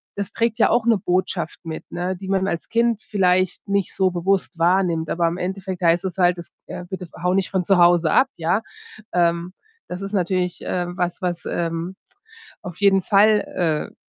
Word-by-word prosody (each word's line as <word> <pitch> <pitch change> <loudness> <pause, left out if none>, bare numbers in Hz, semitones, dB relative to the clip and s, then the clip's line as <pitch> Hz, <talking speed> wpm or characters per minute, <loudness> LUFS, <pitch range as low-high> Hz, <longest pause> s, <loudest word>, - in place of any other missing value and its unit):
das 200 -2 -4
trägt 230 -1 0
ja - - +5
auch 240 -1 +2
'ne 230 -2 +4
Botschaft 180 -2 -2
mit, 160 -1 -6
ne, 180 +2 -2
die 190 +1 -9
man 190 0 +1
als 170 -3 -3
Kind 230 -1 +1
vielleicht 185 -1 +1
nicht 200 -2 0
so 190 -1 +3
bewusst 180 0 -1
wahrnimmt, 170 -2 +2
aber 170 -1 +1
im 170 +1 -2
Endeffekt 190 0 -4
heißt 170 +2 +3
es 185 -1 -4
halt, 180 -1 +3
es 170 - -9 0.2
ja: 180 - -6
„Bitte 185 0 -7
ver 170 - -14
hau 180 0 +2
nicht 195 -1 0
von 190 -2 0
zu 195 0 +4
Hause 175 -2 +5
ab“, 265 - +4
ja. 170 +5 +1 0.5
Ähm, 170 0 +1 0.4
das 180 +1 -5
ist 195 +1 -6
natürlich, 180 -2 0
äh, 180 -1 -1
was 175 +1 -3
was, 175 -2 -3
ähm, 170 +2 -3 0.7
auf 180 -3 -8
jeden 195 -2 +4
Fall, 195 -6 +2
äh, - - -23
180 Hz, 195 wpm, -22 LUFS, 175-195 Hz, 0.7 s, ja